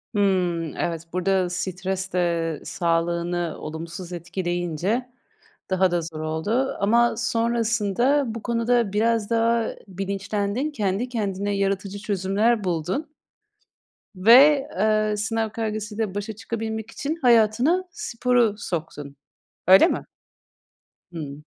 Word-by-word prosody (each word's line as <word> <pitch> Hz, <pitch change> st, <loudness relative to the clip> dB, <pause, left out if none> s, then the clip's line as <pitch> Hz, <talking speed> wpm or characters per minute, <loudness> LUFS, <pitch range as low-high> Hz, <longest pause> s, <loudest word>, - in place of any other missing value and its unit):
Hımm, 180 Hz, -5 st, +1 dB
evet 165 Hz, -1 st, -2 dB
burada 185 Hz, 0 st, +1 dB
stres 190 Hz, +1 st, -3 dB
de 170 Hz, -3 st, 0 dB
sağlığını 170 Hz, 0 st, -1 dB
olumsuz 170 Hz, +3 st, -7 dB
etkileyince 175 Hz, +6 st, -2 dB, 0.6 s
daha 190 Hz, -1 st, +3 dB
da 175 Hz, -1 st, +1 dB
zor 160 Hz, -1 st, -7 dB
oldu 185 Hz, +12 st, -1 dB
ama 235 Hz, +3 st, +3 dB
sonrasında 235 Hz, +3 st, +1 dB
bu 230 Hz, -, -6 dB
konuda 235 Hz, -2 st, +1 dB
biraz 225 Hz, 0 st, +1 dB
daha 230 Hz, 0 st, +2 dB, 0.2 s
bilinçlendin. 200 Hz, -, -2 dB
Kendi 210 Hz, -1 st, -1 dB
kendine 205 Hz, -3 st, -2 dB
yaratıcı 195 Hz, 0 st, -1 dB
çözümler 205 Hz, +2 st, +1 dB
buldun. 185 Hz, -, -2 dB, 1.0 s
Ve, 270 Hz, +8 st, +7 dB
ııı, 215 Hz, 0 st, +2 dB
sınav 220 Hz, +1 st, -1 dB
kaygısıyla 215 Hz, -2 st, -3 dB
başa 205 Hz, +2 st, -3 dB
çıkabilmek 220 Hz, +1 st, -5 dB
için 295 Hz, +7 st, -3 dB
hayatına 245 Hz, -, +4 dB
sporu 240 Hz, -6 st, +1 dB
soktun. 150 Hz, -6 st, -5 dB, 0.5 s
Öyle 190 Hz, -, +8 dB
mi? -, -, -2 dB, 1.1 s
Hıı. 150 Hz, -3 st, -6 dB
205 Hz, 105 wpm, -24 LUFS, 180-230 Hz, 1.1 s, Öyle